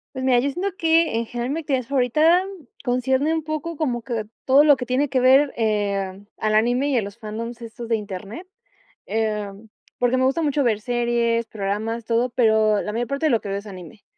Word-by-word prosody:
Pues 260 - -4
mira, 250 -2 +4
yo 280 - 0
siento 360 +8 -2
que, 325 -1 +4
eh, - - +1
en 230 - -2
general, 240 +2 -4
mi 320 - -2
actividad 270 -5 -1
favorita 305 +7 +3 0.4
concierne 260 +4 +1
un 320 -1 -1
poco 310 +2 -4
como 250 -6 -1
que 230 -3 -3 0.2
todo 275 +3 +5
lo 290 -2 +6
que 255 - -4
tiene 255 +4 0
que 260 -1 +1
ver, 265 +3 +5
eh, 200 -3 -1 0.2
al 215 0 -1
anime 245 +5 +2
y 270 - +1
a - - 0
los 200 0 -8
fandoms 230 +2 -7
estos 230 +1 -8
de 230 - +1
Internet. 205 - -7 0.6
Eh, 215 -2 -1 0.5
porque 245 +1 +2
me 260 - +1
gusta 270 +5 +1
mucho 290 -2 +1
ver 220 -4 +1
series, 235 -1 0
programas, 220 +2 -3
todo, 235 +2 +1
pero 220 -3 +3
la 210 - -4
mayor 235 +2 -2
parte 280 +5 -1
de - - +2
lo 235 -5 +3
que 205 - -8
veo 195 0 -2
es 205 - -12
anime. 190 +2 -11
240 Hz, 215 wpm, -22 LUFS, 220-275 Hz, 0.6 s, lo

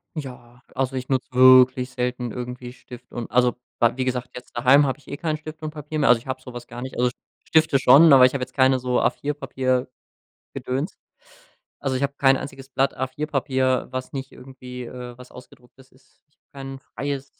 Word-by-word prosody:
Ja. 125 -4 -9
Also, 135 0 -1
ich 130 0 -5
nutze 130 -2 -1
wirklich 130 0 +6
selten 125 -1 -3
irgendwie 125 0 -7
Stift 125 -1 -14
und 120 -2 -6
also 125 0 +3 0.2
Bla 120 +1 +2
wie 130 - -1
gesagt, 125 -1 -2
jetzt 125 - -11
daheim 130 +4 +5
habe 135 0 -2
ich 140 - -25
eh 140 - -6
kein 155 -2 -2
Stift 155 +1 -10
und 155 - -4
Papier 150 0 -6
mehr, 145 - +2
also 125 -1 +6
ich 115 - -18
habe 130 0 -3
so 125 -1 -11
was 120 0 -9
gar 120 - -9
nicht. 130 - -7
Also, 125 0 +2 0.4
Stifte 155 -3 +3
schon, 140 +5 +7
aber 130 -2 +8
ich 130 - +2
habe 140 - -3
jetzt 125 0 -5
keine 130 -1 +3
so 125 0 0
A4-Papier-Gedöns. 130 -3 -2 1.7
Also, 135 -2 -2
ich 135 - -2
habe 140 - -1
kein 135 -1 +5
einziges 135 0 -9
Blatt 135 0 0
A4-Papier, 130 -1 -1
was 130 0 -5
nicht 135 -1 -6
irgendwie, 125 -1 -10
äh, 125 0 -9
was 125 0 -14
ausgedrucktes 125 +1 -17
ist. 130 0 -28
Ich 145 - -41
habe - - -76
kein 135 -1 -8
freies 140 +2 -5
130 Hz, 200 wpm, -23 LUFS, 125-135 Hz, 1.7 s, aber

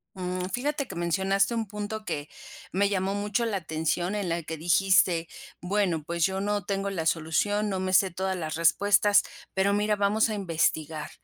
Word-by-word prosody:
Mm, 180 0 -3
fíjate 280 +2 -1
que 190 - -7
mencionaste 190 +5 +1
un 225 -1 -2
punto 210 +1 -5
que 145 -7 -4 0.5
me 200 +2 +2
llamó 195 -1 0
mucho 205 +3 -1
la 215 -3 -1
atención 160 +2 -2
en 205 -3 -2
la 170 0 -2
que 160 +1 -5
dijiste: 175 0 +3 0.3
"Bueno, 180 -4 0
pues 170 +1 0
yo 190 0 -1
no 205 -1 -1
tengo 200 0 -1
la 175 -5 -3
solución, 175 +7 +1
no 190 -2 -2
me 185 0 -2
sé 190 0 +4
todas 190 +2 -2
las 155 -4 -4
respuestas, 205 +5 +4 0.3
pero 195 +1 +2
mira, 210 +1 +1
vamos 205 +2 +2
a - - -2
investigar, 160 -5 -1
190 Hz, 180 wpm, -27 LUFS, 170-205 Hz, 0.5 s, sé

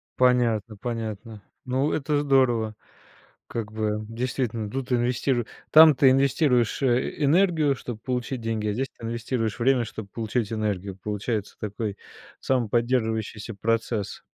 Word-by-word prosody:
Понятно 120 -4 +2
понятно. 110 -2 -5 0.2
Ну, 130 +3 0
это 150 0 0
здорово, 120 -6 +2 0.7
как 110 -2 -5
бы 110 -1 -2
действительно: 115 -2 -2
тут 130 +2 -4
инвестиру 120 0 +1 0.3
там 155 0 +9
ты 135 -1 +6
инвестируешь, 130 -3 +2
э, 130 +3 0
энергию, 155 -1 +3
чтоб 120 -3 -7
получить 125 0 -3
деньги, 110 -2 -2
а 105 - 0
здесь 130 +5 -1
ты 115 - -8
инвестируешь 115 -1 -2
время, 125 0 +3
чтоб 110 -3 -8
получить 115 0 -2
энергию. 100 -3 -2
Получается 105 0 -3
такой, 105 -1 -4 0.4
самоподдерживающийся 115 -3 0
процесс. 115 0 -2
115 Hz, 125 wpm, -25 LUFS, 110-130 Hz, 0.7 s, там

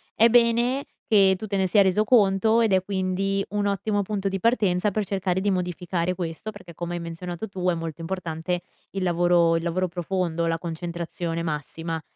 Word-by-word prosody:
è 230 +2 +6
bene 240 +3 +3 0.2
che 195 -3 +5
tu 215 - -6
te 200 -1 -1
ne 190 -1 +2
sia 200 +2 +5
reso 195 +3 +3
conto, 220 0 +4
ed 220 -3 +2
è 190 -1 +4
quindi 195 0 -1
un 205 0 -1
ottimo 205 +1 0
punto 200 -1 -2
di 195 0 -3
partenza 205 -3 +2
per 210 +1 0
cercare 190 -1 -1
di 200 0 +1
modificare 180 0 -1
questo, 170 +5 -5
perché 185 -4 -12
come 175 +2 -5
hai 170 - -4
menzionato 175 +4 -6
tu 185 -2 -3
è 180 - +2
molto 165 -1 -5
importante 175 0 -3 0.3
il 195 -1 -3
lavoro 175 -1 +3
il 165 - -4
lavoro 180 +1 0
profondo, 175 -1 -1
la 165 0 +1
concentrazione 170 0 -4
massima. 160 +1 -4
185 Hz, 190 wpm, -25 LUFS, 170-200 Hz, 0.3 s, è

